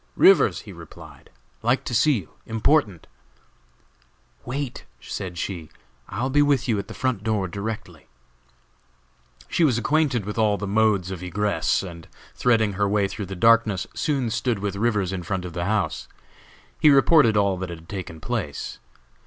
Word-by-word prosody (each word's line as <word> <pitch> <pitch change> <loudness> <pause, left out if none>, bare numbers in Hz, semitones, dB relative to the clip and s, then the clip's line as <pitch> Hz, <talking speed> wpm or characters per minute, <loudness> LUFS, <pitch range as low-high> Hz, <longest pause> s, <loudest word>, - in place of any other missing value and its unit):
"Rivers," 390 +3 +5
he - - -11
replied; - - -13 0.3
"like - - +1
to - - -5
see 155 - +4
you; 100 - -4 0.2
important." 110 - +1 1.4
"Wait," 135 +1 -4 0.2
said 90 -2 -6
she; 85 -3 -4 0.4
"I 105 +6 -3
will 130 - -1
be 145 +2 +4
with 140 -3 +2
you 110 -4 +1
at 100 - -6
the - - -9
front 130 -6 -1
door 105 -3 0
directly." 100 +5 -6 1.4
She 170 - +1
was 130 -7 +3
acquainted 135 -3 +1
with 105 +2 -4
all 105 -2 +3
the 105 - -4
modes 100 -3 +2
of 90 -2 -6
egress, 100 +4 0
and 85 -3 -9 0.3
threading 110 -4 +2
her 100 +1 0
way 100 -1 +2
through 100 0 -6
the 95 - -6
darkness, 115 -1 +3
soon 135 -6 -1
stood 120 0 0
with 100 0 -3
Rivers 105 -3 0
in 95 - -3
front 90 +1 -3
of 90 - -7
the 85 0 -3
house. 105 -1 -1 0.7
He 155 - +6
reported 140 -5 +5
all 100 -2 +2
that 95 0 -5
had 85 -1 -9
taken 90 -5 -7
place. 105 -9 -4
105 Hz, 165 wpm, -24 LUFS, 95-120 Hz, 1.4 s, He